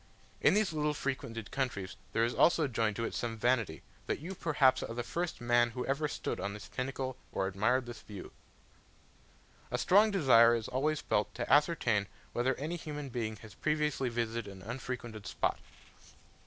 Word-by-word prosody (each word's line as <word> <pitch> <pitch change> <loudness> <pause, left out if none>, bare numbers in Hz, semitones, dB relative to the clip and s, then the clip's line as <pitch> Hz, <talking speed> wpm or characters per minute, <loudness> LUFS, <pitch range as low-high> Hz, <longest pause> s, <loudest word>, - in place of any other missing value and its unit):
In - - +5
these 210 -5 +2
little 150 -1 0
frequented 115 -6 -4
countries 110 -9 -2 0.2
there 115 - +2
is 120 - -1
also 165 -3 +4
joined 110 -4 0
to 115 - -1
it - - -4
some 115 -1 -3
vanity, 115 -8 +1 0.2
that - - 0
you 170 +6 -6
perhaps 140 -7 +3
are 115 - -5
the 120 - -2
first 170 +7 -3
man 120 0 +3
who 125 +2 -4
ever 140 +3 0
stood - - -3
on 100 +1 -3
this 105 - -10
pinnacle 130 0 -3
or 95 - 0
admired 110 +7 +1
this 120 0 -8
view. 100 -3 -9 1.4
A - - -1
strong 205 +4 +5
desire 125 - +6
is 115 -2 -3
always 150 +4 0
felt 105 - 0
to 120 - 0
ascertain 135 - +3 0.3
whether 125 +2 +1
any 155 +5 -3
human 150 -3 -6
being 115 -3 -3
has 110 -3 -11
previously 150 - 0
visited 115 -3 -2
an 95 -1 -11
unfrequented 115 -2 -5
spot. - - 0
125 Hz, 175 wpm, -32 LUFS, 115-145 Hz, 1.4 s, desire